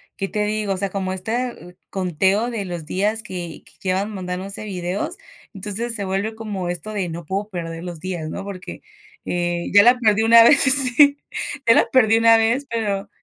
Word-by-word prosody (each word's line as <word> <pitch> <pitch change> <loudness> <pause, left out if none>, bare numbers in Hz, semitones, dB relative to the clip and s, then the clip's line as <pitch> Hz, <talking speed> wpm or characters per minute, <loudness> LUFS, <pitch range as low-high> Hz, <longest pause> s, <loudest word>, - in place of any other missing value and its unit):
¿qué 195 - -3
te 210 -1 -1
digo? 210 -2 -1
O - - -4
sea, 200 0 -1
como 190 -1 -3
este 220 -3 -4
conteo 190 +5 0
de 210 -4 -4
los 175 -3 -6
días 210 +6 -1
que 175 -3 -7
que - - -19
llevan 195 +3 -1
mandándose 185 +2 -5
videos, 185 -1 -4 0.4
entonces 210 +4 -3
se 200 -2 -3
vuelve 200 +4 -2
como 205 -5 -5
esto 180 +5 -5
de 190 -4 -2
no 165 0 -7
puedo 200 +5 -3
perder 165 -2 -6
los 175 -3 -7
días, 170 -3 -5
¿no? 195 - -6
Porque, 190 -2 -8 0.4
eh, 175 -1 -2
ya 205 0 +8
la 245 +1 +5
perdí 220 -1 +3
una 230 0 +8
vez, 295 +6 +6
sí. 280 +2 +5 0.5
Ya 230 - +7
la - - +4
perdí 225 -4 +4
una 230 0 +6
vez, 230 +5 +1
pero 205 -4 -2
200 Hz, 190 wpm, -21 LUFS, 180-225 Hz, 0.5 s, ya